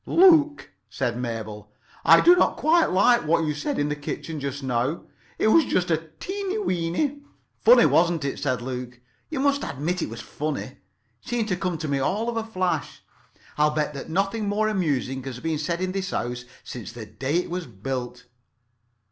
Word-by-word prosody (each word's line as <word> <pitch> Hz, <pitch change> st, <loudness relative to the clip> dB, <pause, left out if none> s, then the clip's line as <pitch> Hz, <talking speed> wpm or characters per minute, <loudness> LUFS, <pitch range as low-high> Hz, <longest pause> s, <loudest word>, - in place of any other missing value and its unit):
"Luke," 325 Hz, -5 st, +5 dB, 0.2 s
said 120 Hz, 0 st, -2 dB
Mabel, 110 Hz, -3 st, -5 dB, 0.3 s
"I -, -, +7 dB
did 355 Hz, +1 st, +7 dB
not -, -, +2 dB
quite 325 Hz, +2 st, +3 dB
like 200 Hz, +6 st, +4 dB
what 165 Hz, +1 st, +3 dB
you 150 Hz, -, 0 dB
said 145 Hz, 0 st, -3 dB
in 145 Hz, -, +1 dB
the 150 Hz, -, -1 dB
kitchen 150 Hz, +2 st, -5 dB
just 140 Hz, 0 st, -4 dB
now. 130 Hz, +4 st, -1 dB, 0.3 s
It 215 Hz, -, +3 dB
was 325 Hz, +8 st, +6 dB
just 180 Hz, -8 st, 0 dB
a 160 Hz, 0 st, -1 dB
teeny 395 Hz, +1 st, -3 dB
weeny——" 270 Hz, -, -1 dB, 0.4 s
"Funny, -, -, +7 dB
wasn't 170 Hz, -3 st, +3 dB
it?" 140 Hz, -, -3 dB
said 130 Hz, -4 st, -1 dB
Luke. 125 Hz, -1 st, -6 dB, 0.3 s
"You 300 Hz, -, -3 dB
must 280 Hz, +1 st, +2 dB
admit 165 Hz, +6 st, -2 dB
it -, -, -2 dB
was 115 Hz, 0 st, -7 dB
funny. 150 Hz, 0 st, -5 dB, 0.4 s
Seemed 235 Hz, -2 st, -2 dB
to 185 Hz, -, +1 dB
come 180 Hz, -2 st, -2 dB
to 155 Hz, -, -4 dB
me 140 Hz, -1 st, 0 dB
all 205 Hz, -, 0 dB
of 235 Hz, -, -3 dB
a 225 Hz, -, -1 dB
flash. 185 Hz, -5 st, -2 dB, 0.6 s
I'll 150 Hz, 0 st, +5 dB
bet 150 Hz, -1 st, 0 dB
that 140 Hz, -, -7 dB
nothing 200 Hz, +5 st, 0 dB
more 215 Hz, +1 st, +1 dB
amusing 145 Hz, -9 st, -1 dB
has 130 Hz, -2 st, -7 dB
been 160 Hz, 0 st, -2 dB
said 170 Hz, +3 st, -2 dB
in 185 Hz, 0 st, -1 dB
this 190 Hz, -1 st, -3 dB
house 125 Hz, +1 st, -3 dB, 0.2 s
since 120 Hz, -4 st, -7 dB
the 115 Hz, -2 st, -8 dB
day 135 Hz, +7 st, -3 dB
it 175 Hz, 0 st, 0 dB
was 180 Hz, -3 st, -3 dB
built. 125 Hz, +3 st, -5 dB
160 Hz, 190 wpm, -25 LUFS, 130-210 Hz, 0.6 s, I